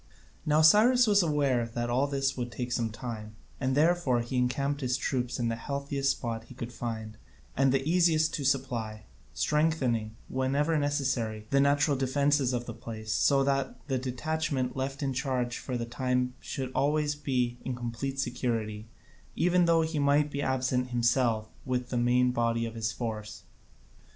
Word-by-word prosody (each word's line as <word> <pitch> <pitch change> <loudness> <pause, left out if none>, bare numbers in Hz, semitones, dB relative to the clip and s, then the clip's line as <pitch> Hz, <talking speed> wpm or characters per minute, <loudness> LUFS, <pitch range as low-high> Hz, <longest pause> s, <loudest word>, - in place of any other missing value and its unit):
Now 155 +1 +4
Cyrus 235 +9 +6
was 205 -2 +4
aware 145 -7 +1
that 120 0 -1
all 130 +4 +2
this 135 -1 0
would 120 -1 -4
take 125 0 -4
some 115 -2 0
time, 110 -1 -7 0.2
and 130 0 0
therefore 155 -6 +3
he 120 +3 -5
encamped 140 +3 0
his 125 0 0
troops 125 -1 -2
in 120 - 0
the 115 - -1
healthiest 140 +2 -2
spot 115 -2 -4
he 125 - -13
could 120 -1 -6
find 110 -2 -5 0.4
and 135 0 +3
the 135 +1 0
easiest 160 -2 +3
to 145 - -2
supply, 120 -5 -1 0.3
strengthening, 130 -9 +1
wherever 140 +5 0
necessary, 130 -7 -1
the 140 - +4
natural 145 +1 +3
defences 135 0 +2
of 120 -1 -2
the 120 - -6
place, 110 -1 -5
so 140 -1 +3
that 135 -1 0
the 130 -1 +1
detachment 130 0 -2
left 135 +2 -3
in 135 -1 -1
charge 125 -2 -1
for 125 -2 -4
the 115 - -3
time 125 +1 -1
should 130 -2 -5
always 150 +1 +1
be 125 -4 -1
in 130 - -3
complete 120 +3 -4
security, 115 -4 -2 0.5
even 180 +1 +3
though 165 -1 +4
he 160 -1 -2
might 145 +1 +3
be 140 - -2
absent 130 -1 0
himself 120 -2 +1 0.2
with 125 -1 -2
the - - -3
main 125 +1 +3
body 115 -1 0
of 115 - -5
his 110 -1 -2
force. 110 -2 -5
130 Hz, 170 wpm, -29 LUFS, 120-145 Hz, 0.5 s, Cyrus